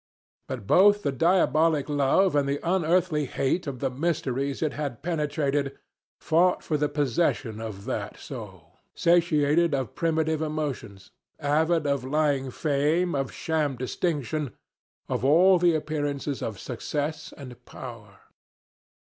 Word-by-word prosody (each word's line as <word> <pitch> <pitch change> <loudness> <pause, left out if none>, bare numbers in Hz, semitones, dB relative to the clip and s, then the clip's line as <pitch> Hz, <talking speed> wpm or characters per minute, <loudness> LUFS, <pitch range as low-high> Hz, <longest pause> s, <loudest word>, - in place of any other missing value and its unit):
But 125 -6 -6
both 205 - +5
the 140 - +1
diabolic 160 0 +2
love 145 +5 +2
and 140 -1 +2
the 140 +1 -1
unearthly 170 -3 +2
hate 140 +7 -1
of 130 -3 -5
the 135 - 0
mysteries 140 -2 -1
it 155 - 0
had 140 -4 -5
penetrated 145 -4 -1 0.4
fought 175 +3 +2
for 155 - -1
the 150 0 +1
possession 130 -5 0
of 105 -3 -7
that 105 -1 -4
soul 95 - -10 0.2
satiated 170 -2 +3
with 130 -6 -2
primitive 160 -1 0
emotions, 145 -11 -4 0.3
avid 160 +2 +1
of 140 -2 0
lying 140 -1 0
fame, 155 +6 0
of 135 -2 -2
sham 155 -4 -1
distinction, 145 - -2 0.5
of - - -2
all 175 +7 +5
the 170 -1 +4
appearances 145 -2 -2
of 105 -4 -4
success 150 +5 -4
and 125 -3 -11
power. 105 -6 -10
145 Hz, 130 wpm, -26 LUFS, 135-160 Hz, 0.5 s, both